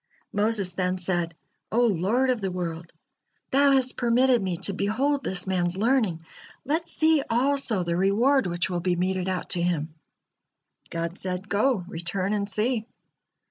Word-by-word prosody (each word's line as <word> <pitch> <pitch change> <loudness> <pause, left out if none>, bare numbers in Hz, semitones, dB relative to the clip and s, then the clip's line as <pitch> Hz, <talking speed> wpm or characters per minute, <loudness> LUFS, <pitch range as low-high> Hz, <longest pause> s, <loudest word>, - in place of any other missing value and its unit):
Moses 205 -3 0
then 185 0 -1
said: 175 -2 -1 0.4
"O 235 - +2
Lord 225 +6 +1
of 245 -4 -2
the 195 - -1
world! 170 -2 -5 0.6
Thou 280 +1 +4
has 260 -1 +2
permitted 245 0 +2
me 185 -3 -2
to 200 - -1
behold 260 +9 0
this 185 -6 -1
man's 180 -1 -1
learning, 210 -8 +1 0.4
let 325 +4 0
see 315 -1 +5
also 245 -4 +1
the 170 0 -1
reward 215 +7 +2
which 175 0 -1
will 180 -2 -2
be 180 0 0
meted 185 +1 -1
out 185 -1 -3
to 175 - +4
him." 165 -3 -1 1.0
God 170 +1 -4
said: 185 +1 -4
"Go, 210 -2 +1
return 185 +3 -3
and 200 -1 -2
see." 220 +3 0
195 Hz, 155 wpm, -25 LUFS, 180-245 Hz, 1.0 s, see